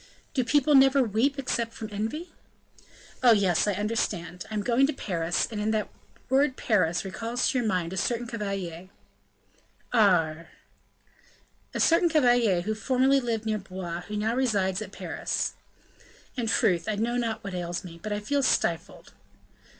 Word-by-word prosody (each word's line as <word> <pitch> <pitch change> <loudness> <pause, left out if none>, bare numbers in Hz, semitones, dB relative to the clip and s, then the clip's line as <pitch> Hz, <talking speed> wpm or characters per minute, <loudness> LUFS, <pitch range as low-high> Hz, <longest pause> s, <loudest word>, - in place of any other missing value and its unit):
"Do 260 -4 +1
people 290 +3 +3
never 270 0 +6
weep 240 +6 +1
except 235 -4 -2
from 220 - -6
envy?" 225 - -4 0.9
"Oh! 245 -2 +7
yes, 195 -3 +2
I 205 - +2
understand; 185 -4 -2
I 215 - -5
am 205 - -1
going 250 +4 +3
to 305 - -2
Paris 175 -8 -1
and 215 0 -1
that 215 - -1 0.4
word 265 0 +2
Paris 180 -6 +1
recalls 230 +5 -2
to 260 - 0
your 235 - -1
mind 180 -3 -1
a - - -5
certain 240 +5 -1
cavalier 195 -6 -5 0.5
" 100 0 -25
"Aure!" 160 +1 +3 1.3
"A - - -1
certain 335 +1 +4
cavalier 245 - +3
who 215 +5 -2
formerly 260 +4 +2
lived 230 -3 -2
near 215 -1 0
Blois, 185 -3 -6
and 175 - -8
who 210 - -5
now 220 +2 0
resides 205 -7 +1
at 205 -3 -7
Paris." - - -3 0.8
"In 240 -3 -2
truth, 180 -4 +2
I 215 - 0
know 230 +3 -1
not 230 -2 -2
what 195 -1 -6
ails 175 -1 -3
me, 170 -2 -10
but 215 - -5
I 205 - -1
feel 280 +7 0
stifled." 260 - -1
215 Hz, 165 wpm, -27 LUFS, 185-250 Hz, 1.3 s, Oh